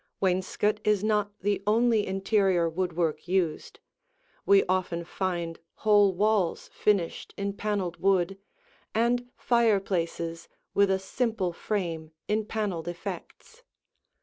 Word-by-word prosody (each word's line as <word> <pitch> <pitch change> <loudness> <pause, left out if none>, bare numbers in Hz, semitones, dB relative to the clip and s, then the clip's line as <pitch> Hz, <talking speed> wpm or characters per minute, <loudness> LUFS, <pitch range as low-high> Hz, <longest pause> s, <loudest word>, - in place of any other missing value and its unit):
Wainscot 190 +3 +1
is 210 -2 +2
not 210 -1 +1
the 200 +1 0
only 225 0 +3
interior 195 -2 +2
woodwork 170 -1 -1
used; 175 -4 -1 0.7
we 200 0 +6
often 180 -2 -1
find 170 -2 -3 0.2
whole 205 -2 +4
walls 200 -1 0
finished 200 -6 0
in 200 0 -2
paneled 200 -4 -2
wood, 195 0 +1 0.6
and 240 +2 +1
fireplaces 190 -8 0 0.2
with 200 -1 +4
a 190 - +3
simple 195 -1 -1
frame 165 -5 -3
in 215 0 0
paneled 200 -7 -3
effects. 175 - -7
195 Hz, 110 wpm, -28 LUFS, 175-210 Hz, 0.7 s, we